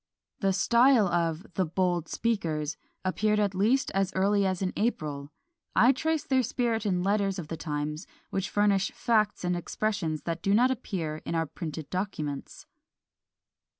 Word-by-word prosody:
The 195 -1 +2
style 235 +3 +4
of 170 +1 0
"the 190 - +1
bold 175 -1 0
speakers" 160 -9 -1 0.3
appeared 210 +3 +1
at 205 -2 +1
least 225 +8 +2
as 195 -1 +1
early 200 +1 +3
as 185 0 -1
in 185 - -1
April; 150 -10 -2 0.4
I 245 +4 +6
trace 315 +4 0
their 265 -1 +2
spirit 230 -2 -1
in 180 -2 +1
letters 200 0 +1
of 165 -4 -6
the 165 - -3
times, 150 +1 -4 0.2
which 195 -2 -2
furnish 200 -2 +2
facts 215 -5 +1
and 180 0 +1
expressions 175 -2 -2
that 165 0 -3
do 195 +3 +2
not 250 +4 +4
appear 180 -11 -3
in - - -3
our 165 0 +1
printed 155 -1 -6
documents. 155 -7 -4
190 Hz, 155 wpm, -28 LUFS, 165-215 Hz, 0.4 s, I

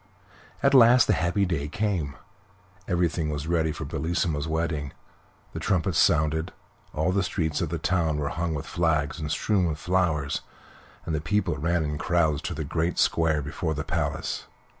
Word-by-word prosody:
At 140 0 +4
last 125 -1 +7
the - - +3
happy 90 +3 +1
day 80 -5 -2
came. 85 -5 -2 0.7
Everything 85 -3 0
was 75 -1 -3
ready 80 -1 +1
for 75 - -6
Bellissima's 80 -2 -1
wedding. 80 -3 -2 0.6
The - - -4
trumpets 90 -3 +1
sounded, 80 0 +2 0.4
all 80 +4 0
the 100 +1 +2
streets 80 -3 -1
of 85 - -1
the 85 - -2
town 80 -1 0
were 70 -1 -1
hung 80 0 -2
with 70 - -4
flags 75 -3 0
and 75 -2 -4
strewn 90 +4 +1
with 75 -2 -2
flowers, 80 -5 0 0.6
and 80 - -2
the 75 - -1
people 85 +1 0
ran 85 +3 0
in 75 -1 -3
crowds 80 -4 +1
to 85 - -4
the 80 - -3
great 80 +4 -1
square 80 -3 +2
before 80 +3 -3
the 75 - -3
palace. - - -2
80 Hz, 170 wpm, -26 LUFS, 75-85 Hz, 0.7 s, last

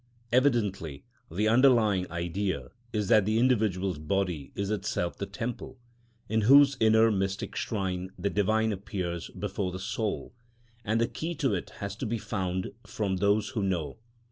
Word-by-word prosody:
Evidently 105 - +1 0.3
the 105 +7 0
underlying 110 -6 +4
idea 85 +3 -2 0.2
is 105 -2 -1
that 105 - +5
the 110 +3 +1
individual's 105 - +1
body 85 -3 -2
is 100 +1 -2
itself 100 -4 -1
the 100 - -5
temple, 120 +5 -5 0.5
in 110 +2 +1
whose 140 +5 +7
inner 110 0 +5
mystic 95 -1 -2
shrine 95 -4 -2
the 100 +3 -1
Divine 110 +2 +2
appears 90 -4 -4
before 95 -2 -3
the 90 - -5
soul, 105 +3 -3 0.5
and 110 +2 +1
the 115 - +2
key 170 +2 -4
to 140 -7 0
it 90 - -3
has 100 -1 -4
to 125 - -3
be 115 +2 -1
found 95 -4 -3
from 100 -3 -2
those 100 +2 +2
who 105 - -2
know. 90 -7 -2
100 Hz, 155 wpm, -28 LUFS, 95-110 Hz, 0.5 s, whose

